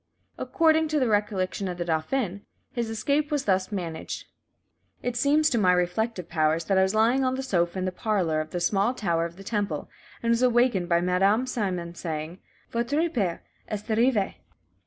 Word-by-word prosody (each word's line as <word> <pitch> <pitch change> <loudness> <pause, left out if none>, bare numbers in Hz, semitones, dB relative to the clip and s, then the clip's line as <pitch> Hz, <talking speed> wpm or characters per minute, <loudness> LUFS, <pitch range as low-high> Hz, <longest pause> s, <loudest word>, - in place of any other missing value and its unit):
According 320 -3 +3
to 305 -1 +1
the 255 - +2
recollection 205 -2 0
of 180 -1 -4
the 175 - -3
dauphin, 180 +5 -1 0.3
his 235 -2 -2
escape 285 +7 0
was 295 -3 -1
thus 190 0 +1
managed: 170 -5 -5 0.8
"It 245 -1 -2
seems 290 +5 +3
to 235 - +2
my 180 -3 +4
reflective 180 +2 -1
powers 160 0 +1
that 195 - +2
I - - +5
was 190 +2 +1
lying 235 +5 +3
on 260 0 +1
the 265 - -3
sofa 175 -7 0
in 185 - -1
the 185 - -1
parlour 180 -6 0
of 155 - -7
the 175 - -3
small 200 +7 +1
Tower 170 -7 0
of 170 0 -7
the 195 - -11
Temple, 200 -8 -2 0.3
and 230 - +2
was 235 +1 +2
awakened 240 -7 +3
by 170 0 +3
Madame 195 +7 +2
Simon 185 -9 -2
saying, 165 0 -5 0.3
'Votre 285 +8 0
père 195 - -1 0.3
est 210 -1 -5
arrivé.' 230 -4 +2
200 Hz, 185 wpm, -26 LUFS, 175-245 Hz, 0.8 s, I